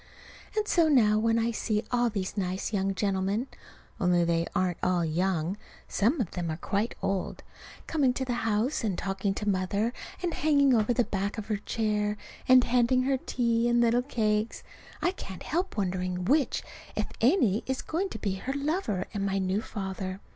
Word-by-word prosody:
And 425 Hz, -1 st, +1 dB
so 335 Hz, -5 st, +4 dB
now, 215 Hz, -7 st, +5 dB
when 225 Hz, +1 st, +2 dB
I 230 Hz, +1 st, +1 dB
see 215 Hz, -1 st, -1 dB
all 245 Hz, -1 st, +2 dB
these 200 Hz, -3 st, -3 dB
nice 190 Hz, +1 st, -2 dB
young 195 Hz, -1 st, 0 dB
gentlemen 195 Hz, +3 st, 0 dB, 0.5 s
(only 180 Hz, -2 st, +3 dB
they 170 Hz, 0 st, +1 dB
aren't 180 Hz, -2 st, 0 dB
all 180 Hz, -2 st, +2 dB
young; 175 Hz, +2 st, 0 dB, 0.3 s
some 240 Hz, +10 st, +1 dB
of 215 Hz, -8 st, -1 dB
them 175 Hz, -2 st, -3 dB
are 155 Hz, -, -3 dB
quite 205 Hz, +6 st, -1 dB
old) 195 Hz, -2 st, -2 dB, 0.4 s
coming 285 Hz, -5 st, +2 dB
to 260 Hz, +1 st, -2 dB
the 250 Hz, -, -1 dB
house 225 Hz, +5 st, 0 dB
and 200 Hz, -5 st, -1 dB
talking 195 Hz, 0 st, -1 dB
to 210 Hz, -, -4 dB
Mother, 200 Hz, +4 st, 0 dB, 0.3 s
and 345 Hz, -2 st, 0 dB
hanging 280 Hz, -3 st, +4 dB
over 220 Hz, 0 st, +3 dB
the 245 Hz, +1 st, +3 dB
back 200 Hz, -1 st, -2 dB
of 215 Hz, 0 st, -6 dB
her 210 Hz, -, +1 dB
chair, 210 Hz, 0 st, -1 dB, 0.3 s
and 255 Hz, -1 st, +7 dB
handing 250 Hz, +1 st, +3 dB
her 265 Hz, +1 st, +2 dB
tea 235 Hz, -2 st, +1 dB
and 240 Hz, 0 st, +3 dB
little 235 Hz, +1 st, +4 dB
cakes, 220 Hz, -4 st, -1 dB, 0.4 s
I 355 Hz, -, +3 dB
can't 190 Hz, -, -8 dB
help 350 Hz, -2 st, -2 dB
wondering 180 Hz, -2 st, -1 dB
which, 285 Hz, -, +2 dB, 0.3 s
if -, -, 0 dB, 0.2 s
any, 235 Hz, -, +4 dB
is 265 Hz, 0 st, -2 dB
going 370 Hz, +5 st, -1 dB
to -, -, -6 dB
be 200 Hz, -3 st, -2 dB
her 265 Hz, +7 st, -3 dB
lover 280 Hz, -, -1 dB
and 200 Hz, -2 st, -2 dB
my 195 Hz, 0 st, 0 dB
new 190 Hz, +2 st, 0 dB
father. 190 Hz, -3 st, -5 dB
210 Hz, 185 wpm, -28 LUFS, 190-245 Hz, 0.5 s, and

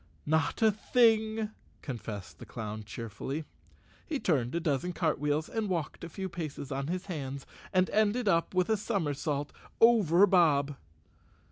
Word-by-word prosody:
"Not 160 Hz, +8 st, +1 dB
a 220 Hz, -, +6 dB
thing," 220 Hz, 0 st, +2 dB, 0.3 s
confessed 110 Hz, -, -6 dB
the -, -, -9 dB
clown 110 Hz, -1 st, -6 dB
cheerfully. 115 Hz, +8 st, -5 dB, 0.6 s
He 305 Hz, -5 st, -2 dB
turned 135 Hz, -, 0 dB
a -, -, +2 dB
dozen 165 Hz, +2 st, -1 dB
cartwheels, 150 Hz, -2 st, 0 dB
walked 185 Hz, -11 st, -2 dB
a 170 Hz, -, -5 dB
few 190 Hz, +3 st, -4 dB
paces 155 Hz, -5 st, -6 dB
on 135 Hz, +1 st, -2 dB
his 180 Hz, +3 st, -3 dB
hands, 140 Hz, -6 st, -5 dB, 0.3 s
and 185 Hz, 0 st, +3 dB
ended 215 Hz, +2 st, +2 dB
up 170 Hz, -1 st, +2 dB
with 185 Hz, +1 st, +2 dB
a 220 Hz, -, +3 dB
somersault 150 Hz, -8 st, -2 dB, 0.3 s
over 205 Hz, -6 st, +6 dB
Bob. 150 Hz, -7 st, +3 dB
165 Hz, 140 wpm, -30 LUFS, 140-200 Hz, 0.6 s, a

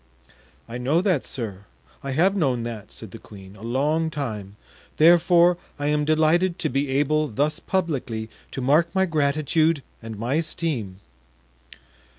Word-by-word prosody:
"I 120 Hz, +1 st, -6 dB
know 140 Hz, +7 st, +2 dB
that, 185 Hz, -8 st, +1 dB
sir; 105 Hz, -5 st, -5 dB, 0.4 s
I 140 Hz, -, -6 dB
have 185 Hz, +8 st, +3 dB
known 130 Hz, -, +1 dB
that," 115 Hz, -3 st, -7 dB
said -, -, -10 dB
the -, -, -10 dB
queen, 95 Hz, -1 st, -13 dB
"a 100 Hz, -, -15 dB
long 145 Hz, +8 st, 0 dB
time; 110 Hz, -10 st, -5 dB, 0.4 s
therefore 175 Hz, +2 st, +5 dB, 0.2 s
I 145 Hz, 0 st, -1 dB
am 150 Hz, 0 st, +1 dB
delighted 160 Hz, +4 st, +2 dB
to -, -, -1 dB
be 140 Hz, +3 st, 0 dB
able 150 Hz, +3 st, +1 dB
thus 145 Hz, +5 st, -1 dB
publicly 135 Hz, -12 st, -2 dB, 0.2 s
to 135 Hz, -, -5 dB
mark 150 Hz, +6 st, +3 dB
my 190 Hz, 0 st, +3 dB
gratitude 155 Hz, -1 st, +1 dB, 0.2 s
and 115 Hz, -1 st, -7 dB
my 120 Hz, +5 st, -2 dB
esteem." 120 Hz, -, -3 dB
145 Hz, 150 wpm, -24 LUFS, 120-160 Hz, 0.4 s, therefore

